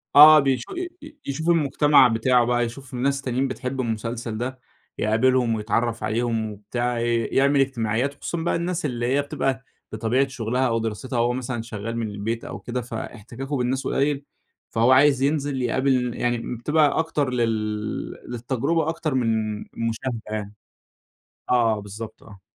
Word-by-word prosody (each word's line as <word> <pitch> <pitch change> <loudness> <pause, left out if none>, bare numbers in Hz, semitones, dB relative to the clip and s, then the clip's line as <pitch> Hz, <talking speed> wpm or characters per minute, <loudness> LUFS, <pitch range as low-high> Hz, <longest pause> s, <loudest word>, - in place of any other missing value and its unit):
آه 155 +1 +11
بيشو 135 -4 -1
ي 360 0 -3
ي 300 0 -12
يشوفوا 160 +5 +1
المجتمع 145 -3 +5
بتاعه 120 +1 +3
بقى، 120 0 +2
يشوفوا 125 +1 -7
ناس 140 +1 +1
تانيين 130 0 0
بتحب 130 0 -3
المسلسل 115 -1 -3
ده، 130 +2 -4 0.4
يقابلهم، 115 +2 +2
ويتعرف 115 +2 -1
عليهم 115 -1 -1
وبتاع، 120 +4 -2
ي 115 0 +1
يعمل 140 +1 +3
إجتماعيات، 130 0 0
وخصوصًا 170 - -4
بقى 170 - +1
الناس 170 0 -2
اللي 120 -4 -2
هي 135 +3 +2
بتبقى 135 -2 -2 0.3
بطبيعة 115 +5 +1
شغلها 130 0 -1
أو 115 -1 +1
دراستها 115 +3 -3
هُو 120 +1 +2
مثلًًا 125 -2 -3
شغال 115 0 -5
من 115 -2 -2
البيت 105 +3 -4
أو - - -6
كده، 125 +1 -4
فإحتكاكُه 120 +3 -6
بالناس 130 +2 -1
قُليل، 140 0 0 0.4
فهُو 115 +3 +3
عايز 135 0 +5
ينزل 140 -2 0
يقابل 125 0 +1
يعني 120 0 -2
بتبقى 150 +4 +2
أكتر 150 -4 0
لل 110 -3 -1 0.2
للتجربة 135 +7 0
أكتر 160 -2 -2
من 110 -4 0 0.2
المشاهدة 115 +1 -3
يعني. 105 -1 -4 1.0
آه 115 -3 +3
بالضبط، 105 +2 -9
آه. 100 -4 -14
125 Hz, 150 wpm, -24 LUFS, 115-135 Hz, 1.0 s, آه